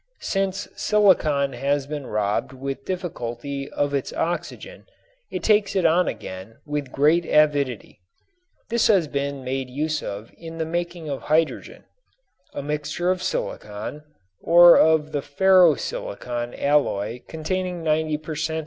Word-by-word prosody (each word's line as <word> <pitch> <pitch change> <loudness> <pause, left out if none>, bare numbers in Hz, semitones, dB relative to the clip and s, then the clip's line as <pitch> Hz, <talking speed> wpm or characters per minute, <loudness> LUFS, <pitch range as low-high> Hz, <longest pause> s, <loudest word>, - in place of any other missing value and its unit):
Since 195 -1 -1
silicon 155 -10 +3
has 140 +3 0
been 145 -2 -6
robbed 105 +4 -1
with 135 +1 -6
difficulty 140 -6 -4
of 145 0 -1
its 140 -2 -2
oxygen 335 - -4 0.4
it - - -5
takes 210 -2 +3
it 185 -3 +2
on 170 +2 +4
again 95 +4 -7
with 145 -3 -4
great 155 +5 +3
avidity. 145 -9 +1 0.7
This 235 0 +2
has 190 -7 +3
been 140 -1 -3
made 130 0 -3
use 155 +4 -2
of 100 +3 -7
in 165 0 -9
the 160 - -1
making 170 0 -4
of 140 -2 -4
hydrogen. 155 +1 -1 0.7
A 140 - -4
mixture 150 +4 -1
of 185 -1 -2
silicon 110 - -4 0.4
(or 175 +1 +8
of 155 -1 +4
the 145 - -1
ferro 180 +2 +5
silicon 125 - -5
alloy 125 -6 0
containing 180 +2 -3
90 155 -1 +1
per 155 +1 -7
cent. 160 +1 -2
150 Hz, 140 wpm, -23 LUFS, 140-175 Hz, 0.7 s, or